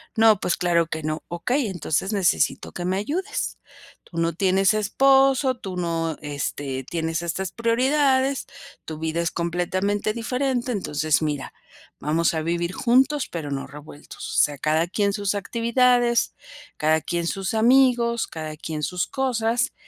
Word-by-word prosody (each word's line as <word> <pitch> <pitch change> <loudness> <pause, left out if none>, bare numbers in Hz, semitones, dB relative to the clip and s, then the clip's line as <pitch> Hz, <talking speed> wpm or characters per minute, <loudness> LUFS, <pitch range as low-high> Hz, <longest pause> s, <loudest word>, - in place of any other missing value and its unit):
"No 220 -2 +5
pues 175 - 0
claro 170 -2 +2
que 160 -1 -4
no". 155 0 -3
"Okey, 240 +9 -1
entonces 190 +2 -2
necesito 195 -3 +1
que 175 - -5
me 185 +1 0
ayudes. 340 - -3 0.5
Tú 170 - -12
no 165 -1 +1
tienes 190 +2 +3
esposo, 270 +4 +3
tú 190 -6 -7
no, 165 -2 -1
este, 145 -2 -4
tienes 165 0 -2
estas 175 +2 -3
prioridades, 265 +3 +2 0.4
tu 155 -1 -6
vida 160 +1 -1
es 170 - -1
completamente 185 +5 -1
diferente. 250 +1 -1
Entonces, 155 -7 0
mira, 150 -3 -3 0.5
vamos 160 +3 +1
a 160 - -1
vivir 170 +2 -1
juntos 265 +5 +2
pero 155 -4 -5
no 135 -1 -3
revueltos. 145 0 -9
O - - +7
sea, 145 -1 -1
cada 155 +4 +1
quien 200 +2 0
sus 200 -1 -1
actividades, 235 +3 +2 0.4
cada 155 +1 +2
quien 170 +1 -2
sus 195 +3 -2
amigos, 235 0 +3
cada 155 -1 -6
quien 155 -1 -5
sus 180 +5 -1
cosas, 240 -3 0
190 Hz, 150 wpm, -24 LUFS, 160-235 Hz, 0.5 s, O